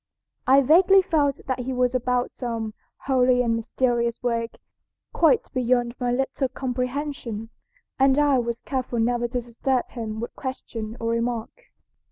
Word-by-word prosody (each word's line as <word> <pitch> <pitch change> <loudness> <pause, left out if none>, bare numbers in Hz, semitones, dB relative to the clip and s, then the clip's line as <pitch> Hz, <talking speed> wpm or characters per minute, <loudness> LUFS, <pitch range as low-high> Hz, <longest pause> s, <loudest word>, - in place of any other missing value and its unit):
I 270 +2 +7
vaguely 370 +7 +6
felt 290 -5 +1
that 260 -1 -2
he 255 +1 -3
was 250 0 +1
about 250 0 0
some 230 -3 -4 0.3
holy 255 -2 +3
and 230 -1 +1
mysterious 235 0 -1
work 230 -1 -1 0.6
quite 320 -4 +4
beyond 245 -1 +1
my 245 -1 0
little 270 +1 -1
comprehension, 250 -3 -4 0.5
and 270 0 +4
I 290 -3 +4
was 235 -1 -3
careful 255 -3 -3
never 240 +1 +1
to 245 +1 -2
disturb 245 +2 -1
him 220 -2 -5
by 235 - -2
question 230 -4 -6
or 230 0 -1
remark. 235 - -3
250 Hz, 145 wpm, -24 LUFS, 235-265 Hz, 0.6 s, I